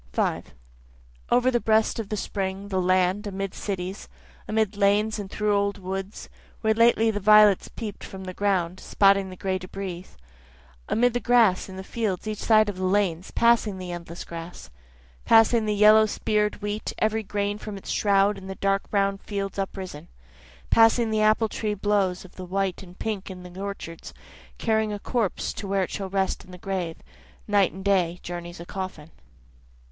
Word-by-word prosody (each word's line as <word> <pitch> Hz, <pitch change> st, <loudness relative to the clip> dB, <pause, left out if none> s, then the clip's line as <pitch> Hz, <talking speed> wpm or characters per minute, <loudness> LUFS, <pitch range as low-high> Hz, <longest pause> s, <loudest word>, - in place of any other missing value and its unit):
5 -, -, -1 dB, 0.8 s
Over 250 Hz, +1 st, +3 dB
the 240 Hz, -, +2 dB
breast 220 Hz, 0 st, +2 dB
of 220 Hz, -, -5 dB
the 210 Hz, -, -2 dB
spring, 195 Hz, 0 st, -3 dB
the 190 Hz, -2 st, 0 dB
land, 185 Hz, +3 st, +2 dB
amid 195 Hz, -1 st, -4 dB
cities, 190 Hz, 0 st, -5 dB, 0.4 s
Amid 215 Hz, -1 st, 0 dB
lanes 205 Hz, +2 st, +2 dB
and 200 Hz, -2 st, -6 dB
through 210 Hz, 0 st, 0 dB
old 200 Hz, 0 st, 0 dB
woods, 195 Hz, +1 st, -6 dB, 0.3 s
where 220 Hz, -1 st, +3 dB
lately 225 Hz, 0 st, +4 dB
the 205 Hz, -, -3 dB
violets 210 Hz, -1 st, +6 dB
peep'd 215 Hz, -4 st, -7 dB
from 190 Hz, 0 st, -8 dB
the 185 Hz, 0 st, -6 dB
ground, 185 Hz, -3 st, 0 dB
spotting 195 Hz, -1 st, +3 dB
the 185 Hz, -, -9 dB
gray 185 Hz, 0 st, -2 dB
debris, 185 Hz, -1 st, -6 dB, 0.8 s
Amid 245 Hz, +1 st, +2 dB
the 245 Hz, -, 0 dB
grass 230 Hz, -7 st, +3 dB
in 190 Hz, -, -9 dB
the 190 Hz, -, -6 dB
fields 215 Hz, -1 st, -3 dB
each 215 Hz, -1 st, -3 dB
side 215 Hz, -1 st, +4 dB
of 205 Hz, -3 st, -4 dB
the 185 Hz, -, -4 dB
lanes, 185 Hz, -2 st, 0 dB
passing 235 Hz, -4 st, +2 dB
the 180 Hz, -1 st, -6 dB
endless 170 Hz, 0 st, -7 dB
grass, 165 Hz, -, -9 dB, 0.5 s
Passing 225 Hz, 0 st, +5 dB
the 210 Hz, -, +1 dB
yellow 215 Hz, +1 st, +6 dB
spear'd 210 Hz, -1 st, -1 dB
wheat, 205 Hz, +1 st, -3 dB
every 220 Hz, +1 st, +1 dB
grain 205 Hz, 0 st, -2 dB
from 210 Hz, -2 st, -7 dB
its 195 Hz, -, -7 dB
shroud 200 Hz, 0 st, +2 dB
in 190 Hz, -, -11 dB
the 190 Hz, -, -5 dB
dark 195 Hz, 0 st, 0 dB
brown 200 Hz, -1 st, +1 dB
fields 200 Hz, -1 st, -4 dB
uprisen, 190 Hz, -5 st, -5 dB, 0.6 s
Passing 225 Hz, 0 st, +5 dB
the 215 Hz, 0 st, +1 dB
apple 215 Hz, +1 st, +3 dB
tree 215 Hz, -1 st, -3 dB
blows 195 Hz, -2 st, 0 dB
of 185 Hz, -, -16 dB
white 185 Hz, 0 st, -2 dB
and 180 Hz, -1 st, -13 dB
pink 210 Hz, -3 st, -4 dB
in 185 Hz, -1 st, -9 dB
the 180 Hz, +1 st, -10 dB
orchards, 165 Hz, -, -7 dB, 0.4 s
Carrying 220 Hz, -1 st, +1 dB
a 205 Hz, -, -3 dB
corpse 220 Hz, -1 st, -2 dB
to 200 Hz, -, -6 dB
where 195 Hz, 0 st, +1 dB
it -, -, -5 dB
shall 195 Hz, -2 st, -4 dB
rest 190 Hz, 0 st, -1 dB
in -, -, -18 dB
the 180 Hz, -, -10 dB
grave, 180 Hz, -3 st, -3 dB, 0.5 s
Night 205 Hz, -3 st, +3 dB
and 190 Hz, +1 st, -10 dB
day 180 Hz, -3 st, +2 dB
journeys 175 Hz, 0 st, -7 dB
a 170 Hz, -, -8 dB
coffin. 185 Hz, -5 st, -6 dB
200 Hz, 180 wpm, -25 LUFS, 185-215 Hz, 0.8 s, violets